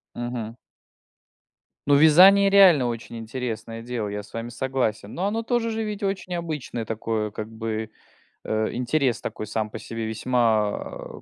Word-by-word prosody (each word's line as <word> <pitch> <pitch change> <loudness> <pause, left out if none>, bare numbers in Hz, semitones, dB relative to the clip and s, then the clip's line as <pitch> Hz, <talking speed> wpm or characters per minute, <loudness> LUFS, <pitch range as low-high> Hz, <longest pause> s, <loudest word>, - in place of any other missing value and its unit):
Мгм. 120 -2 -5 1.3
Ну, 145 - +6
вязание 185 +7 +7
реально 185 -10 +6
очень 115 0 -5
интересное 115 -1 -5
дело, 120 -3 -3
я 105 0 -4
с 105 - -18
вами 115 +1 -5
согласен. 120 -5 -2
Но 185 - -2
оно 220 +3 -1
тоже 235 0 0
же 225 0 -2
ведь 210 0 -5
очень 195 -2 -2
обычное 150 -9 -4
такое, 110 -1 -2
как 110 +1 -6
бы, 110 -1 -4 0.5
э, 110 0 -1
интерес 125 +1 0
такой 110 - -5
сам 110 0 -2
по - - -7
себе 115 -1 -5
весьма 110 -2 -1
120 Hz, 150 wpm, -24 LUFS, 110-160 Hz, 1.3 s, вязание